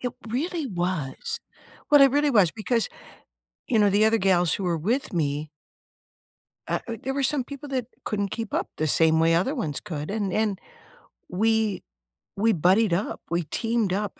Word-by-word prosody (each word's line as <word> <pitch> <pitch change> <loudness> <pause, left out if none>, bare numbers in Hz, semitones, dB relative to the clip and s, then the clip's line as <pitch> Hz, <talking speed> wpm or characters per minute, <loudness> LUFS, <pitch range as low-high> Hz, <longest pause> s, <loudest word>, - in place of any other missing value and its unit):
It 245 -1 -3 0.2
really 310 +6 -2
was. 175 - -3 0.5
What 290 -1 +7
it 275 -1 +7
really 290 +2 +2
was 205 - +4
because, 230 +1 -1 0.8
you 225 - +2
know, 205 -1 +4
the 205 +2 +4
other 220 +1 +3
gals 180 -4 +3
who 195 - -3
were 170 -2 0
with 235 - -1
me 150 -2 -1 1.2
uh - - 0
u 230 - -3
there 270 +1 -2
were 280 - 0
some 270 -1 +1
people 280 +2 -9
that 260 -4 -2 0.2
couldn't 200 -2 -1
keep 225 0 -5
up - - -1
the 155 - 0
same 160 +1 +3
way 165 0 +4
other 190 - +1
ones 160 - -3
could, 150 -1 -5
and 205 -3 -2
and 210 -2 0 0.7
we 220 +1 +1 0.5
we 225 +3 +3
buddied 185 +4 +3
up, 190 +5 -2
we 170 +1 0
teamed 225 +3 -1
up. 205 0 -3
205 Hz, 180 wpm, -25 LUFS, 175-235 Hz, 1.2 s, What